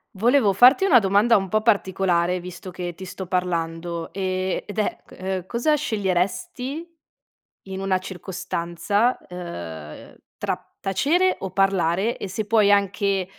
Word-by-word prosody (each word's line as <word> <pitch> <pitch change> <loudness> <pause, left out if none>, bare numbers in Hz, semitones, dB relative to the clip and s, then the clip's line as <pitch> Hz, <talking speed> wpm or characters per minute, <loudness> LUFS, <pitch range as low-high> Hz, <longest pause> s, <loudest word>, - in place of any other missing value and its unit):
Volevo 235 +1 +4
farti 250 - +6
una 300 -11 +7
domanda 205 +3 +4
un 195 -1 -2
po' 215 +3 +1
particolare 190 -5 +1
visto 180 +1 -9
che 175 -1 -5
ti 190 - -8
sto 185 0 -7
parlando, 170 -2 -2
ehm, 185 -1 -1
ed 205 - -9
è 215 - 0
ehm, 185 -1 -4
cosa 240 +9 +1
sceglieresti 220 - -2 0.8
in 190 0 -5
una 195 -1 +1
circostanza, 185 +4 -1
ehm, 85 - -8 0.2
tra - - -2 0.2
tacere 335 - +2
o 190 - -5
parlare? 195 +2 +1
E - - -5
se 210 +4 -3
puoi 210 -1 +4
anche 200 -1 +1
190 Hz, 135 wpm, -23 LUFS, 180-215 Hz, 0.8 s, una